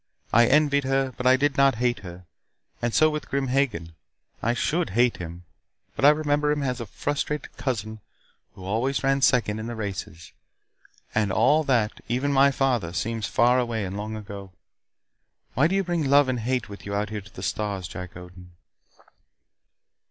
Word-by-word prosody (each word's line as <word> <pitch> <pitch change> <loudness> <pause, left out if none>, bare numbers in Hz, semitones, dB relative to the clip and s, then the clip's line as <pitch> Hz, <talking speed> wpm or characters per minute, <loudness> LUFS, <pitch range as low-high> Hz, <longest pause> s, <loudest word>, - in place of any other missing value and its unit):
I 120 +1 +6
envied 145 0 +3
her, 135 -1 0
but 125 - -1
I 130 +1 +6
did 145 +1 0
not 135 -2 +4
hate 120 0 0
her. 90 -2 -10 0.6
And 120 0 0
so 155 - +5
with 150 0 -5
Grim 135 -1 -1
Hagen. 115 -12 0 0.5
I 115 +2 +1
should 165 +6 0
hate 120 0 +3
him, 85 0 -8 0.5
but - - -5
I 145 - +9
remember 150 -1 +2
him 150 -1 -1
as 125 -2 -2
a 115 - -6
frustrated 145 +6 -3
cousin 110 -4 -3 0.6
who 95 - -10
always 120 +8 -1
ran 135 0 +2
second 120 -5 +2
in 110 - -5
the 120 - -5
races. 100 -4 -6 0.8
And 105 -3 +1
all 145 +10 +3
that 120 -6 +1
even 130 +5 0
my 140 +1 +6
father 125 -11 0
seems 115 +2 -2
far 125 +3 +3
away 115 -4 -1
and 95 +1 -5
long 105 +2 -4
ago. 100 -3 -9 1.0
Why 140 +6 +3
do 190 - -1
you 195 - +2
bring 170 -4 -1
love 140 0 +5
and 130 -2 -1
hate 125 +1 -1
with 100 -1 -10
you 100 - -3
out 105 0 -2
here 105 -1 -4
to 100 - -17
the 95 - -7
stars, 100 -1 -2
Jack 90 +1 -8
Odin?" 90 0 -13
120 Hz, 180 wpm, -25 LUFS, 105-140 Hz, 1.0 s, I